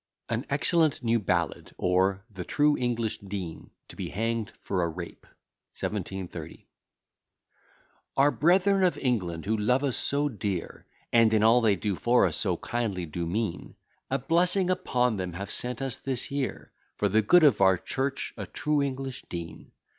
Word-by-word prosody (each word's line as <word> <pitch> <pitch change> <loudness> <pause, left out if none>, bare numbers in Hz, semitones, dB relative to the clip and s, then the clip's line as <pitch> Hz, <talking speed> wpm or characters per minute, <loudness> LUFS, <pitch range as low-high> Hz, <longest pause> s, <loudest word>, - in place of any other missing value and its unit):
AN 115 +4 -2
EXCELLENT 155 0 +2
NEW 115 0 +2
BALLAD 85 -5 -2
OR, 95 +2 +1
THE 95 -3 -6
TRUE 145 - +2
ENGLISH 115 -3 -1
DEAN 95 -4 -6 0.2
TO - - -12
BE - - -5
HANGED 115 +2 -2
FOR 95 -2 -2
A 85 - 0
RAPE. 85 +1 -8 0.5
1730 95 -5 -5 1.5
Our 140 +2 +5
brethren 190 +5 +3
of 180 - +2
England, 90 - -1
who 110 +2 +1
love 125 +6 +1
us 135 -4 +1
so 145 +1 +2
dear, 100 - -4 0.3
And 115 -2 +5
in 110 - +3
all 115 +2 +6
they 110 -3 +4
do 100 +1 -2
for 120 +6 +3
us - - 0
so 90 -5 +1
kindly 105 -6 -2
do 85 +2 -4
mean, 100 0 -3 0.3
(A 135 - +1
blessing 180 +6 +2
upon 125 - +1
them!) 90 -2 -4
have 100 +3 -6
sent 125 +1 -4
us 135 -1 -2
this 130 -1 -3
year, 140 -2 -3 0.2
For 105 - +1
the 110 +3 +3
good 175 +10 +5
of 135 -10 +5
our 95 -1 +5
church, 135 +8 -3
a - - -5
true 150 -1 0
English 135 -1 -4
dean. 85 -2 -7
115 Hz, 165 wpm, -27 LUFS, 95-135 Hz, 1.5 s, all